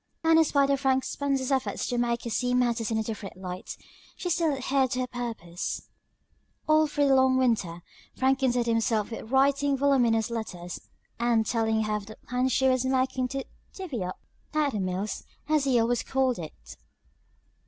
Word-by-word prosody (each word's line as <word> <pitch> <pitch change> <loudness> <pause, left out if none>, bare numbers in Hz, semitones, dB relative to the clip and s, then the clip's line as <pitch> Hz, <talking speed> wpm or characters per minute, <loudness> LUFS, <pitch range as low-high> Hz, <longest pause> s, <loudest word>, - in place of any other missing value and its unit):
And 325 0 +5
in - - +7
spite 280 -2 +2
of 275 - +2
Frank 265 -1 +2
Spencer's 275 -2 -1
efforts 265 -1 0
to 245 - -2
make 235 -1 0
her 235 - -4
see 250 +3 0
matters 235 -2 +1
in 225 - 0
a 220 - 0
different 210 -4 -6
light, 185 0 -7 0.4
she 355 - -3
still 330 -2 +2
adhered 270 -1 +1
to 255 - -1
her - - 0
purpose. 225 -9 -5 0.8
All 310 0 +5
through 290 -1 +1
the - - +5
long 260 -1 +4
winter 205 -10 0 0.3
Frank 265 +1 +2
contented 250 -3 +1
himself 225 -2 +1
with 225 -1 -7
writing 275 +1 +3
voluminous 245 -5 +2
letters, 180 -6 -5 0.4
and 235 -2 +2
telling 220 -1 +1
her 215 0 0
of 205 -1 -9
the 215 - -10
plans 250 +1 +1
he 265 - +3
was 255 -1 +2
making 260 -1 +1
to 270 +1 -4 0.3
"divvy 305 - -4
up" 180 0 -5 0.4
at 300 -2 +2
the 215 - -3
mills, 190 +2 -3 0.2
as 305 -2 +2
he 255 -3 +3
always 235 +1 +1
called 265 -4 0
it. 65 - -10
250 Hz, 185 wpm, -27 LUFS, 220-270 Hz, 0.8 s, in